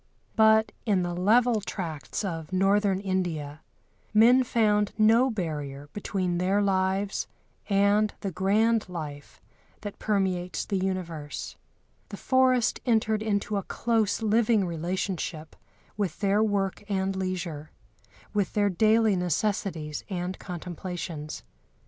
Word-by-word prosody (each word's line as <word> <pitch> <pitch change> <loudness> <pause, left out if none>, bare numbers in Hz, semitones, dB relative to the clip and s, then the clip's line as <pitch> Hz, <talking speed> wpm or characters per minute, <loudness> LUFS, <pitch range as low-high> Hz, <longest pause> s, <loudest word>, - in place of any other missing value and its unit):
But 220 0 +5
in 195 -4 +1
the 175 0 -2
level 220 +5 +3
tracts 180 -1 -4
of 165 -3 -5
Northern 195 +1 +2
India 170 -7 -3 0.5
men 245 +4 +6
found 210 -4 +2
no 225 +4 +5
barrier 145 - -4
between 185 -4 -2
their 190 +3 +2
lives 195 0 0 0.4
and 205 +1 +3
the 195 - -3
grand 210 +4 +2
life 150 -5 -7 0.4
that 205 -2 -7
permeates 190 -4 -1
the 200 - -1
universe. 170 -6 -4 0.5
The - - -7
forest 260 -2 +2
entered 220 -3 +1
into 205 -1 -1
a - - 0
close 225 +1 0
living 220 -1 +3
relationship 170 -1 -3 0.4
with 195 -6 -2
their 200 0 +2
work 200 -3 0
and 195 -1 0
leisure, 180 -5 -4 0.6
with 205 -3 0
their 205 -1 +2
daily 220 +2 +3
necessities 180 -3 -2
and 180 -1 -4
contemplations. 175 -3 -6
195 Hz, 115 wpm, -27 LUFS, 175-215 Hz, 0.6 s, men